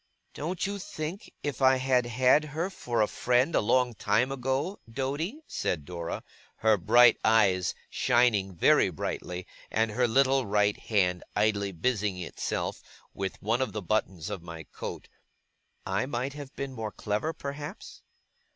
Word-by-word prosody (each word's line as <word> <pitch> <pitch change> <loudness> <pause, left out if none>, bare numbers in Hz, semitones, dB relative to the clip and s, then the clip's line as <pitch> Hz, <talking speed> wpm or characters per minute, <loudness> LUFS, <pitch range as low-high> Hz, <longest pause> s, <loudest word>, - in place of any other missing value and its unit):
'Don't 170 +4 -3
you 200 +1 -3
think, 170 +3 -6
if 145 -1 -3
I 130 0 +6
had 130 -2 +2
had 130 +5 +4
her 160 +5 -3
for 120 - 0
a - - +1
friend 125 +9 +1
a - - +3
long 125 +3 +2
time 110 +5 +1
ago, 135 +8 -1
Doady,' 145 - -3
said 80 - -2
Dora, 85 -1 -5 0.4
her 110 -1 +6
bright 115 +5 +6
eyes 100 -5 +3
shining 105 -6 +2
very - - +4
brightly, 90 0 -4 0.2
and 110 0 +1
her 120 +3 +2
little 135 +1 +3
right 105 0 +2
hand 90 -5 0
idly 105 -2 +1
busying 100 +1 -1
itself 90 -2 -3 0.3
with 95 -1 -4
one 115 +5 +1
of 130 - -1
the 105 - -3
buttons 95 -2 -1
of 100 -4 -4
my 85 -1 -8
coat, - - -7 0.8
'I 95 +6 0
might 130 +1 -2
have 145 -2 -8
been 140 -1 -4
more 110 -3 -4
clever 105 +12 -2
perhaps? 145 -1 -7
120 Hz, 150 wpm, -28 LUFS, 100-135 Hz, 0.8 s, I